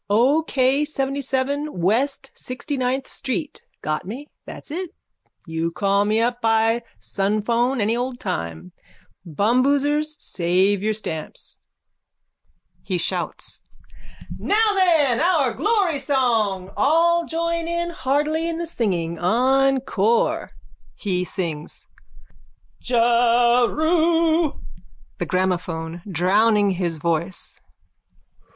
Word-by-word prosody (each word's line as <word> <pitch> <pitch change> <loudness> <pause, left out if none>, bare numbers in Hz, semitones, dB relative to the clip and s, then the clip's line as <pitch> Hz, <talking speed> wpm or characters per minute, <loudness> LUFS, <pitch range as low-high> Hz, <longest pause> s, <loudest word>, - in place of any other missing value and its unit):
O. 250 +9 +4
K. 270 -2 +1
Seventyseven 280 0 -2
west 245 +10 0
sixtyninth 260 0 -3
street. 280 +3 -4 0.2
Got 155 +2 -2
me? 235 +10 -7 0.2
That's - - -10
it. 360 +3 -4 0.6
You 165 0 -2
call 200 +3 +1
me 215 +2 +1
up 240 +1 0
by 225 +1 +2 0.2
sunphone 230 +6 0
any 215 +2 +1
old 245 +1 -3
time. 85 - -4 0.6
Bumboosers, 280 - +1
save 185 +3 +1
your 215 +1 0
stamps. 160 -7 -7 1.2
(He 185 - -2
shouts.) 170 - -4 0.8
Now 430 +1 +2
then 325 - +3
our 315 -8 +2
glory 390 - +1
song. 225 -9 0
All 335 +4 +3
join 335 0 -2 0.2
heartily 305 +2 0
in 330 - -3
the 340 - -3
singing. 175 - -2
Encore! 250 +1 +2 0.5
(He 180 -4 -1
sings.) 170 -5 -5 1.0
Jeru... 250 +8 +3 0.7
THE - - -2
GRAMOPHONE: 175 -3 -2
_(Drowning 205 +3 +3
his 175 -3 -2
voice.) 170 +3 -2
240 Hz, 95 wpm, -22 LUFS, 195-290 Hz, 1.2 s, O